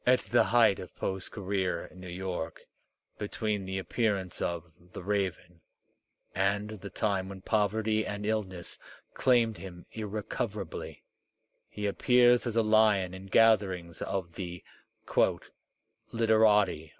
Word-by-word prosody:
At 125 0 +4
the 120 - +3
height 115 -5 +4
of - - -9
Poe's 95 -1 -3
career 95 -4 -2
in 90 - -15
New 90 - -9
York, 90 -2 -4 0.6
between 105 -1 -2
the 95 0 -3
appearance 100 -2 -1
of 85 -1 -3 0.2
"The - - -7
Raven" 90 -3 -2 0.7
and 100 +2 0
the 100 - -7
time 95 -1 -1
when 95 -1 -8
poverty 110 +1 +1
and 105 0 -4
illness 100 -5 -3 0.3
claimed 120 -4 +3
him 90 -2 -10
irrecoverably, 105 +1 -5 0.7
he 105 - -5
appears 120 +4 +4
as 115 - -2
a 115 - +4
lion 110 -4 +4
in 95 +1 -9
gatherings 95 -6 +3
of 95 -3 -3
the 90 -2 -6 1.5
"literati." 110 -8 +3
100 Hz, 125 wpm, -30 LUFS, 95-110 Hz, 1.5 s, At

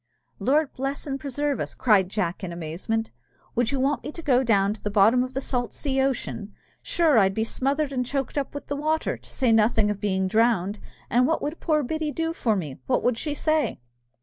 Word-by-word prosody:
"Lord 295 +2 +2
bless 275 +2 -3
and 275 -2 -3
preserve 285 +1 -2
us!" - - -4
cried 200 -6 +3
Jack, 190 -2 -2
in 180 - -4
amazement, 175 +7 -3 0.4
"would 240 -1 +1
you 275 - -1
want 275 0 +1
me 290 - -5
to 335 - -8
go 255 -4 +4
down 200 -4 +3
to 215 - -13
the 210 - -2
bottom 215 +5 +4
of 255 0 -7
the 270 - -1
salt 245 -3 -2
sea 270 -2 -1
ocean? 240 -6 -2 0.3
Sure, 320 -8 +3
I'd 195 -1 +3
be 220 - +1
smothered 275 +5 -1
and 250 -1 0
choked 270 +2 -3
up 285 -1 -2
with 285 - -6
the 285 - -3
water, 310 +2 0
to - - -15
say 255 -4 +1
nothing 220 -1 +4
of 205 - -5
being 190 -2 0
drowned! 215 -2 +2 0.3
And 250 +2 +4
what 325 - +1
would 300 +3 -3
poor 305 -3 +1
Biddy 310 +3 -2
do 325 +2 -2
for 225 -9 +1
me, 165 -8 -3
and 130 - -12
what - - +1
would 245 -2 +1
she 295 -2 -3
say?" 310 0 +1
250 Hz, 225 wpm, -25 LUFS, 210-285 Hz, 0.4 s, go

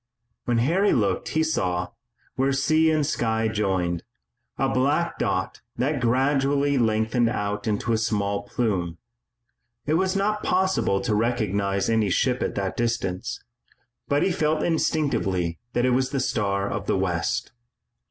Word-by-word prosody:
When 120 -1 +1
Harry 170 - +3
looked 105 -4 0
he 160 - +4
saw, 90 - -1 0.5
where 135 +1 +1
sea 155 +4 +3
and 155 -2 +2
sky 110 -5 0
joined, 95 -6 -1 0.6
a 135 - +1
black 140 +6 0
dot - - -1 0.2
that 140 +1 0
gradually 135 +3 +2
lengthened 110 +1 +2
out 105 -2 -3
into 110 +2 0
a 110 - +1
small 100 -2 0
plume. 95 -6 -2 0.9
It 150 - 0
was 190 +1 0
not 210 +2 0
possible 185 - +1
to 105 - -1
recognize 100 -4 0
any 110 -3 +2
ship 125 +7 +1
at - - -2
that 95 -1 -2
distance, 115 -1 -2 0.6
but 145 +1 +2
he 195 - +2
felt 155 -2 0
instinctively 100 - 0
that 120 - +1
it 130 - +3
was 130 +1 +1
the 135 0 -1
Star 100 -5 0
of - - -4
the - - +1
West. - - -1
120 Hz, 145 wpm, -24 LUFS, 100-140 Hz, 0.9 s, he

